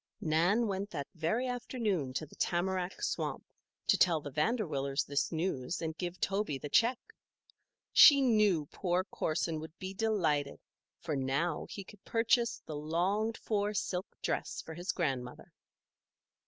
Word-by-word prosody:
Nan 175 Hz, +9 st, +2 dB
went 200 Hz, -1 st, -2 dB
that 145 Hz, -7 st, -4 dB
very 180 Hz, +10 st, 0 dB
afternoon 225 Hz, -, -2 dB
to 155 Hz, -, -2 dB
the 150 Hz, -, -19 dB
tamarack 185 Hz, +1 st, -1 dB
swamp -, -, -2 dB, 0.4 s
to -, -, +3 dB
tell 170 Hz, -3 st, +4 dB
the 145 Hz, -1 st, -7 dB
Vanderwillers 150 Hz, -, 0 dB
this 140 Hz, +1 st, 0 dB
news 165 Hz, -3 st, -2 dB
and 160 Hz, -1 st, -3 dB
give 175 Hz, +1 st, -5 dB
Toby 195 Hz, -7 st, 0 dB
the 145 Hz, -, -7 dB
check. 235 Hz, -, +4 dB, 1.0 s
She 285 Hz, -3 st, +9 dB
knew 215 Hz, -, +3 dB
poor 180 Hz, -1 st, 0 dB
Corson 165 Hz, -3 st, -2 dB
would 160 Hz, +1 st, -9 dB
be 190 Hz, +1 st, -6 dB
delighted, 175 Hz, -10 st, 0 dB, 0.4 s
for 155 Hz, -, -3 dB
now 140 Hz, +5 st, -1 dB
he 200 Hz, -, -6 dB
could 200 Hz, +1 st, -16 dB
purchase 235 Hz, +1 st, +1 dB
the 155 Hz, -, -6 dB
longed 185 Hz, +9 st, 0 dB
for 210 Hz, -1 st, -1 dB
silk 185 Hz, -1 st, -2 dB, 0.2 s
dress -, -, -2 dB
for 160 Hz, -, -8 dB
his 175 Hz, +3 st, -2 dB
grandmother. 130 Hz, -7 st, -3 dB
175 Hz, 145 wpm, -32 LUFS, 155-210 Hz, 1.0 s, She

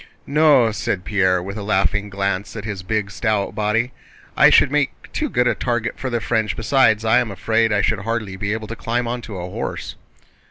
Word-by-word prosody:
"No," 145 Hz, -6 st, +4 dB
said 100 Hz, -3 st, -3 dB
Pierre, 95 Hz, -3 st, +2 dB
with 100 Hz, +3 st, -6 dB
a -, -, -4 dB
laughing 100 Hz, 0 st, 0 dB
glance 100 Hz, 0 st, -2 dB
at 110 Hz, -2 st, -6 dB
his 105 Hz, -4 st, -4 dB
big, 100 Hz, +1 st, -2 dB
stout 105 Hz, -1 st, -1 dB
body. 110 Hz, +3 st, 0 dB, 0.4 s
"I -, -, +7 dB
should -, -, +5 dB
make 150 Hz, -2 st, -1 dB
too 305 Hz, -, -1 dB
good 125 Hz, -, +1 dB
a 120 Hz, -, +3 dB
target 120 Hz, -2 st, -2 dB
for 130 Hz, -, -3 dB
the 120 Hz, -1 st, -1 dB
French, 110 Hz, -2 st, -1 dB
besides 115 Hz, -2 st, +3 dB
I 110 Hz, -, +5 dB
am 120 Hz, -, -1 dB
afraid 110 Hz, +3 st, +1 dB
I 105 Hz, -2 st, +2 dB
should 110 Hz, -, +1 dB
hardly 110 Hz, -2 st, -3 dB
be 100 Hz, +2 st, -3 dB
able 110 Hz, 0 st, -3 dB
to 115 Hz, -, -5 dB
climb 120 Hz, +1 st, -2 dB
onto 120 Hz, -4 st, -5 dB
a 90 Hz, 0 st, -5 dB
horse." -, -, -5 dB
110 Hz, 205 wpm, -20 LUFS, 100-120 Hz, 0.4 s, I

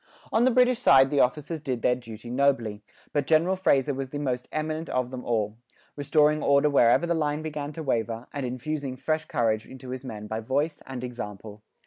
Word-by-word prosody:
On 225 Hz, +2 st, +4 dB
the -, -, +5 dB
British 250 Hz, -1 st, +3 dB
side 135 Hz, -, +6 dB
the 145 Hz, -, +2 dB
officers 150 Hz, +5 st, 0 dB
did 130 Hz, -5 st, -3 dB
their 125 Hz, -, +4 dB
duty 120 Hz, -1 st, -8 dB
nobly; 125 Hz, -6 st, +1 dB, 0.3 s
but 145 Hz, -2 st, 0 dB
General 170 Hz, +4 st, +3 dB
Fraser 145 Hz, -7 st, +2 dB
was 135 Hz, 0 st, -4 dB
the 145 Hz, -, -5 dB
most 130 Hz, -4 st, -2 dB
eminent 155 Hz, +1 st, -3 dB
of 125 Hz, -1 st, -1 dB
them 130 Hz, -1 st, -6 dB
all, 110 Hz, -2 st, -1 dB, 0.4 s
restoring 150 Hz, +1 st, +3 dB
order 140 Hz, +1 st, +3 dB
wherever 120 Hz, +3 st, +4 dB
the 170 Hz, -, +1 dB
line 150 Hz, -1 st, -1 dB
began 150 Hz, -2 st, -4 dB
to 160 Hz, -, -6 dB
waver, 115 Hz, -3 st, -1 dB
and 140 Hz, -, -3 dB
infusing 130 Hz, +2 st, -3 dB
fresh 155 Hz, +4 st, -1 dB
courage 110 Hz, -2 st, 0 dB
into 130 Hz, -1 st, -11 dB
his 130 Hz, +1 st, -5 dB
men 110 Hz, -5 st, -7 dB
by 110 Hz, +1 st, -3 dB
voice 140 Hz, +7 st, -1 dB
and 130 Hz, -2 st, -6 dB
example. 105 Hz, -4 st, -7 dB
135 Hz, 195 wpm, -26 LUFS, 120-150 Hz, 0.4 s, side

